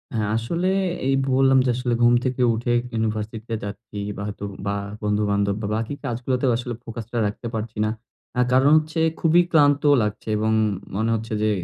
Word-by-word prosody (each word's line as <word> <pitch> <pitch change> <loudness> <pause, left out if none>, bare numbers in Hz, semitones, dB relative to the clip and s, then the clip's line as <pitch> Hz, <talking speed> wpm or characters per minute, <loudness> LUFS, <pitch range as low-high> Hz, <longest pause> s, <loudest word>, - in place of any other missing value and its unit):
হ্যাঁ 105 -2 0
আসলে 170 +11 -1 0.4
এই 135 - +3 0.2
বললাম 135 0 +5
যে - - +1
আসলে 125 -1 -1
ঘুম 120 - +6
থেকে 130 0 -1
উঠে 120 +2 -1 0.2
ইউনিভার্সিটি 110 0 -2
তে 115 - -2
যাচ্ছি, 105 +1 -8 0.2
বা - - -5
হয়তো 100 -1 -7 0.2
বা 100 - 0 0.3
বন্ধুবান্ধব 100 -1 +1
বা 100 - -2
বাকি 115 +5 -2
কাজগুলাতে 125 +1 -1
আসলে 120 0 -4
ফোকাস 115 -1 -7
টা 120 - -1
রাখতে 105 +3 -6
পারছি 110 0 -4
না। - - 0 0.5
আ - - +4
কারণ 130 +2 +5
হচ্ছে 155 +1 -1 0.2
খুবই 165 +1 +5
ক্লান্ত 145 -2 +4 0.2
লাগছে 105 +1 -4
এবং 110 +1 +1 0.4
মনে 110 +2 0
হচ্ছে 115 0 -5
যে 110 - +3
115 Hz, 180 wpm, -23 LUFS, 105-130 Hz, 0.5 s, ঘুম